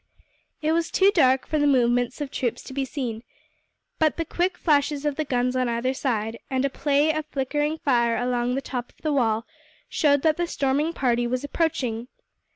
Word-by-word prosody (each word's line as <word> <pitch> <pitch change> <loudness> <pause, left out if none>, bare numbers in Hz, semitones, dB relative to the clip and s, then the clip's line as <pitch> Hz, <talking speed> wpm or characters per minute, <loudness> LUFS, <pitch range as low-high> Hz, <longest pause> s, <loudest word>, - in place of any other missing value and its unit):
It 310 - +2
was 330 0 +1
too 390 +1 +4
dark 265 -7 +4
for 310 - -1
the 290 - +3
movements 245 0 +2
of 285 -2 -4
troops 240 -3 -2
to 265 - -9
be 270 0 -1
seen, 245 -5 -4 0.8
but 315 -2 +2
the 330 - -1
quick 355 +3 -1
flashes 290 -2 +1
of 295 -2 0
the 310 - -1
guns 250 -2 0
on 255 -1 +1
either 235 +3 0
side, 230 -4 -2
and 265 0 0
a 275 - -1
play 290 +2 +2
of 310 0 -2
flickering 295 +2 -1
fire 235 -6 +2
along 245 0 0
the 270 - -1
top 245 -2 -4
of - - -27
the 305 -2 0
wall 230 -4 +1 0.4
showed 285 -2 +2
that 315 -1 +3
the 345 0 0
storming 285 +2 0
party 240 -6 +1
was 250 +2 -2
approaching. 255 -7 -1
270 Hz, 195 wpm, -25 LUFS, 245-300 Hz, 0.8 s, too